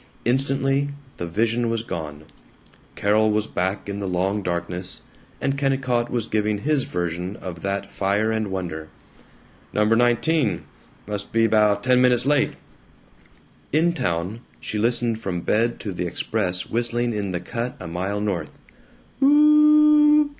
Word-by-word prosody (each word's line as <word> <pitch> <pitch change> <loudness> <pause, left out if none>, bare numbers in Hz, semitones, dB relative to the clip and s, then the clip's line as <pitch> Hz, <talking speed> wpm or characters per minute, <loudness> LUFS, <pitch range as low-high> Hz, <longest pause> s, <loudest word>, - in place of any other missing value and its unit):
Instantly 135 +2 +1 0.3
the 85 - -4
vision 115 +6 0
was 115 -1 -1
gone; 75 -8 -6 0.7
Carol 110 +2 +2
was 105 0 +1
back 95 0 -2
in 100 0 -4
the 100 - -3
long 95 +3 0
darkness; 90 0 -3 0.4
and 135 - 0
Kennicott 130 -3 0
was 120 -3 -1
giving 105 -1 0
his 140 +4 0
version 90 +2 -3
of 85 -3 -8
that 100 +2 -2
fire 105 +3 0
and 110 -2 -1
wonder: 85 -5 -5 0.8
"No. 105 - +2
19. 120 - +2 0.4
Must 105 -1 -5
be 115 0 +3
'bout 105 -2 +3
ten 125 -1 +4
minutes 125 -1 +3
late." 145 0 +2 1.2
In 165 +4 +3
town, 90 - -2 0.2
she 105 - -4
listened 115 0 +1
from 90 -5 -3
bed 115 +6 +1
to 100 - -4
the 90 0 -3
express 90 0 -2
whistling 120 +1 0
in 105 -2 -2
the 90 - -2
cut 120 +8 -4
a - - -8
mile 95 +5 -2
north. 95 -7 -3
105 Hz, 140 wpm, -23 LUFS, 95-120 Hz, 1.2 s, ten